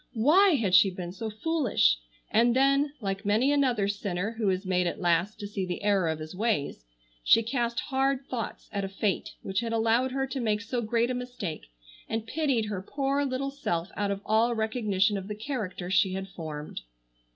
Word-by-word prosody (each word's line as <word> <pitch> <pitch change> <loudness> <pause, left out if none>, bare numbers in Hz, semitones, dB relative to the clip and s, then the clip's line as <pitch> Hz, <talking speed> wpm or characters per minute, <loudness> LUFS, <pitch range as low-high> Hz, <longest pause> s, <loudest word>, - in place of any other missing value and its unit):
Why 335 - +5
had 210 -8 0
she 185 +2 +7
been 180 -1 -6
so 220 +4 -5
foolish! 220 - +2 0.3
And 235 +2 +4
then, 275 +2 +3
like 195 0 -3
many 220 +7 +3
another 255 -8 +2
sinner 200 0 -2
who 210 -3 +2
is 190 +1 -1
made 180 -1 +1
at - - -3
last 175 +3 +1
to 205 - -5
see 200 -1 -3
the 180 +2 -4
error 200 -5 +2
of 160 - -1
his 155 +1 -8
ways, 180 - -1 0.4
she 230 - +5
cast 235 0 -1
hard 270 0 0
thoughts 235 -5 -5
at 200 -1 -2
a 195 - -3
Fate 195 0 -2
which 195 0 -1
had 230 -1 -2
allowed 230 +3 +2
her 270 +1 0
to 270 0 -4
make 215 -3 0
so 235 +2 -2
great 235 +2 +1
a - - 0
mistake, 245 - -5 0.4
and 225 0 -2
pitied 265 -3 0
her 205 -3 -4
poor 275 +6 -1
little 275 0 -2
self 175 -10 -3
out 205 -1 -1
of 200 0 -2
all 225 +2 +3
recognition 215 -3 +1
of 190 - -9
the 210 - -4
character 210 -6 -4
she 190 0 +3
had 190 0 -4
formed. 155 - -7
215 Hz, 195 wpm, -28 LUFS, 190-250 Hz, 0.4 s, she